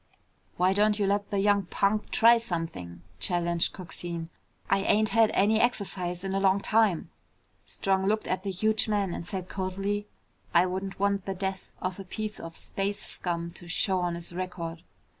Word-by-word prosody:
"Why 185 Hz, +1 st, +4 dB
don't 210 Hz, +1 st, +3 dB
you 205 Hz, -, +1 dB
let 200 Hz, +1 st, 0 dB
the 205 Hz, -, -1 dB
young 200 Hz, -1 st, +3 dB
punk 205 Hz, +3 st, +1 dB
try 235 Hz, 0 st, +6 dB
something?" 165 Hz, -, -4 dB, 0.2 s
challenged 175 Hz, -1 st, +1 dB
Coxine. 170 Hz, -2 st, -6 dB, 0.4 s
"I 195 Hz, -, +3 dB
ain't 210 Hz, +2 st, +3 dB
had 225 Hz, -2 st, +5 dB
any 215 Hz, +2 st, +4 dB
exercise 185 Hz, -6 st, 0 dB
in 190 Hz, 0 st, -2 dB
a 195 Hz, -, +1 dB
long 195 Hz, 0 st, +4 dB
time." 215 Hz, -5 st, +2 dB, 0.6 s
Strong 190 Hz, 0 st, 0 dB
looked 215 Hz, +1 st, +1 dB
at 185 Hz, 0 st, -1 dB
the 200 Hz, -, -3 dB
huge 215 Hz, +4 st, +1 dB
man 200 Hz, -4 st, 0 dB
and 170 Hz, -, -5 dB
said 185 Hz, -2 st, -4 dB
coldly, 195 Hz, +2 st, -2 dB, 0.5 s
"I -, -, +7 dB
wouldn't 190 Hz, +1 st, -4 dB
want 200 Hz, -1 st, +1 dB
the 195 Hz, -, -2 dB
death 190 Hz, 0 st, -4 dB
of 185 Hz, +1 st, -2 dB
a -, -, -5 dB
piece 215 Hz, +3 st, -5 dB
of 165 Hz, 0 st, -8 dB
space 200 Hz, +1 st, -2 dB
scum 170 Hz, -1 st, -4 dB
to 175 Hz, -, -12 dB
show 185 Hz, +2 st, +1 dB
on 175 Hz, -1 st, -1 dB
his 170 Hz, 0 st, -5 dB
record." 175 Hz, -2 st, -4 dB
195 Hz, 180 wpm, -28 LUFS, 175-205 Hz, 0.6 s, I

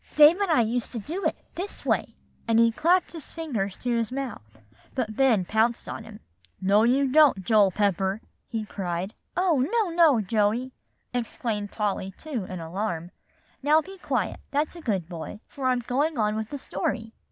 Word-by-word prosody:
"Dave 305 Hz, +5 st, +8 dB
and 400 Hz, -, +1 dB
I 310 Hz, -7 st, +5 dB
used 235 Hz, +1 st, -1 dB
to 235 Hz, -, -3 dB
do 335 Hz, -, -5 dB
it -, -, +1 dB, 0.2 s
this 385 Hz, +3 st, -6 dB
way;" -, -, 0 dB, 0.3 s
and 225 Hz, -1 st, +3 dB
he 230 Hz, 0 st, +5 dB
clapped 345 Hz, +10 st, +2 dB
his 325 Hz, -4 st, -9 dB
fingers 230 Hz, -, -3 dB
to 245 Hz, -1 st, -1 dB
his 230 Hz, -1 st, -1 dB
mouth, 265 Hz, -, -4 dB, 0.5 s
but 225 Hz, -5 st, -2 dB
Ben 230 Hz, -7 st, +3 dB
pounced 225 Hz, +4 st, +1 dB
on -, -, -5 dB
him. 215 Hz, -1 st, -12 dB, 0.4 s
"No, 200 Hz, +3 st, +4 dB
you 265 Hz, +4 st, +3 dB
don't, 290 Hz, -10 st, +5 dB
Joel 210 Hz, -2 st, +5 dB
Pepper," 195 Hz, 0 st, 0 dB, 0.3 s
he 225 Hz, -3 st, -3 dB
cried. 185 Hz, 0 st, -3 dB, 0.2 s
"Oh, 355 Hz, -6 st, +3 dB
no, 385 Hz, -, +1 dB
no, 320 Hz, -8 st, +6 dB
Joey!" 215 Hz, +4 st, +1 dB, 0.4 s
exclaimed 225 Hz, -3 st, -2 dB
Polly 195 Hz, -3 st, -2 dB
too, 270 Hz, -11 st, -4 dB
in 185 Hz, -1 st, -6 dB
alarm; 170 Hz, 0 st, -3 dB, 0.5 s
"now 300 Hz, +3 st, +5 dB
be 380 Hz, +4 st, -8 dB
quiet, 255 Hz, -, -1 dB
that's 295 Hz, +4 st, -1 dB
a 340 Hz, -, -9 dB
good 195 Hz, -, -1 dB
boy, 175 Hz, +4 st, -7 dB
for 270 Hz, -2 st, -3 dB
I'm 250 Hz, -1 st, +2 dB
going 280 Hz, +6 st, 0 dB
on 210 Hz, -1 st, +1 dB
with 220 Hz, 0 st, -3 dB
the 285 Hz, -, -4 dB
story. 225 Hz, -4 st, -3 dB
230 Hz, 180 wpm, -26 LUFS, 205-290 Hz, 0.5 s, Dave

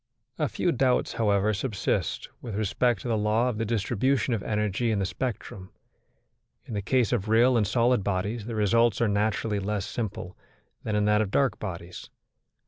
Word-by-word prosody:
A 150 Hz, -3 st, +1 dB
few 175 Hz, -, 0 dB
doubts, 130 Hz, -3 st, +1 dB
however, 105 Hz, -1 st, +2 dB
subsist 105 Hz, 0 st, -2 dB
with 115 Hz, -4 st, -6 dB
respect 110 Hz, +4 st, +1 dB
to -, -, -6 dB
the 115 Hz, -, +1 dB
law 110 Hz, +3 st, +2 dB
of 110 Hz, -3 st, -4 dB
the 115 Hz, -, 0 dB
distribution 120 Hz, +3 st, 0 dB
of 110 Hz, -, -1 dB
energy 105 Hz, +2 st, -1 dB
in 110 Hz, -, +1 dB
the 100 Hz, -, 0 dB
spectrum. 100 Hz, -3 st, -5 dB, 1.0 s
In -, -, -8 dB
the 100 Hz, -, -1 dB
case 125 Hz, +3 st, +1 dB
of 110 Hz, -3 st, -1 dB
real 120 Hz, +3 st, +5 dB
and 110 Hz, -4 st, +2 dB
solid 120 Hz, 0 st, +2 dB
bodies 100 Hz, +3 st, -2 dB
the 115 Hz, -, -4 dB
results 115 Hz, +1 st, +3 dB
are 115 Hz, -, +3 dB
naturally 105 Hz, +1 st, 0 dB
less 100 Hz, 0 st, -2 dB
simple 100 Hz, -5 st, -5 dB, 0.5 s
than 105 Hz, -, -2 dB
in 105 Hz, 0 st, +2 dB
that 105 Hz, 0 st, +3 dB
of 105 Hz, -, -1 dB
dark 130 Hz, 0 st, +1 dB
bodies. 85 Hz, 0 st, -7 dB
110 Hz, 180 wpm, -27 LUFS, 100-120 Hz, 1.0 s, real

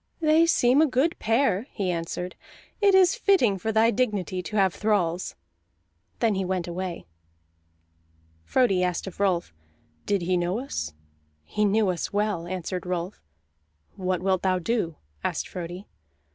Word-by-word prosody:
"They 320 Hz, +1 st, +4 dB
seem 255 Hz, -3 st, +4 dB
a 315 Hz, -, +5 dB
good 275 Hz, +6 st, +1 dB
pair," 225 Hz, -1 st, +1 dB
he 190 Hz, -4 st, -2 dB
answered. 175 Hz, +1 st, -4 dB, 0.5 s
"It 400 Hz, -2 st, +5 dB
is 375 Hz, -2 st, +6 dB
fitting 370 Hz, -, +3 dB
for 220 Hz, +5 st, -1 dB
thy 220 Hz, +1 st, +4 dB
dignity 200 Hz, -6 st, -1 dB
to 210 Hz, -, -7 dB
have 190 Hz, -4 st, +3 dB
thralls." 185 Hz, -3 st, 0 dB, 0.8 s
Then 225 Hz, -3 st, +2 dB
he 190 Hz, -1 st, -1 dB
went 185 Hz, -1 st, -2 dB
away. 175 Hz, 0 st, -5 dB, 1.4 s
Frodi 195 Hz, -, +2 dB
asked 180 Hz, -2 st, -1 dB
of 190 Hz, -1 st, -9 dB
Rolf: 180 Hz, -, +1 dB, 0.5 s
"Did 200 Hz, -3 st, +1 dB
he 180 Hz, +1 st, +1 dB
know 175 Hz, +3 st, 0 dB
us?" 75 Hz, -, -4 dB, 0.5 s
"He 210 Hz, -, 0 dB
knew 205 Hz, 0 st, +3 dB
us 175 Hz, -2 st, -2 dB
well," 205 Hz, -4 st, -1 dB
answered 180 Hz, 0 st, -4 dB
Rolf. 180 Hz, +2 st, -3 dB, 0.7 s
"What 185 Hz, -1 st, -2 dB
wilt 190 Hz, -1 st, +1 dB
thou 185 Hz, -1 st, +2 dB
do?" 180 Hz, -3 st, -1 dB, 0.3 s
asked -, -, -2 dB
Frodi. 180 Hz, +2 st, -7 dB
190 Hz, 145 wpm, -26 LUFS, 180-225 Hz, 1.4 s, is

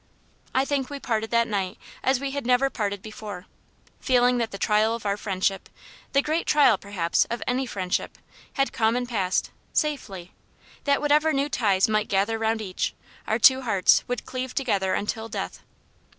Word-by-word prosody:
I 265 Hz, +1 st, +3 dB
think 275 Hz, -2 st, -1 dB
we 285 Hz, -1 st, -6 dB
parted 225 Hz, -3 st, -2 dB
that 235 Hz, 0 st, +2 dB
night 195 Hz, -4 st, -2 dB, 0.2 s
as 265 Hz, -1 st, +2 dB
we 275 Hz, 0 st, -3 dB
had 280 Hz, 0 st, -3 dB
never 250 Hz, +2 st, +2 dB
parted 200 Hz, -3 st, -3 dB
before; 210 Hz, -4 st, -8 dB, 0.5 s
feeling 245 Hz, -1 st, +3 dB
that 230 Hz, -1 st, -1 dB
the 195 Hz, -, -7 dB
trial 215 Hz, +2 st, +2 dB
of 230 Hz, -, -9 dB
our 200 Hz, 0 st, +1 dB
friendship 195 Hz, -1 st, -2 dB, 0.4 s
the 275 Hz, 0 st, +4 dB
great 315 Hz, +2 st, -1 dB
trial, 290 Hz, -7 st, +5 dB
perhaps, 190 Hz, -4 st, 0 dB
of 235 Hz, 0 st, -4 dB
any 255 Hz, +1 st, 0 dB
friendship 185 Hz, -4 st, -2 dB, 0.4 s
had 275 Hz, 0 st, 0 dB
come 225 Hz, 0 st, +2 dB
and 245 Hz, 0 st, -1 dB
passed, 195 Hz, -6 st, -1 dB, 0.2 s
safely: 205 Hz, -, -2 dB, 0.5 s
that 280 Hz, -1 st, +2 dB
whatever 300 Hz, +2 st, +3 dB
new 280 Hz, +1 st, 0 dB
ties 200 Hz, -8 st, +2 dB
might 215 Hz, -1 st, +1 dB
gather 205 Hz, +3 st, +1 dB
round 220 Hz, 0 st, 0 dB
each, 185 Hz, -3 st, -3 dB, 0.3 s
our 220 Hz, -, +1 dB
two 260 Hz, +3 st, +6 dB
hearts 200 Hz, -7 st, +3 dB
would 245 Hz, 0 st, -3 dB
cleave 255 Hz, 0 st, -5 dB
together 200 Hz, -8 st, 0 dB
until 220 Hz, +2 st, -3 dB
death. -, -, -5 dB
225 Hz, 175 wpm, -25 LUFS, 200-265 Hz, 0.5 s, two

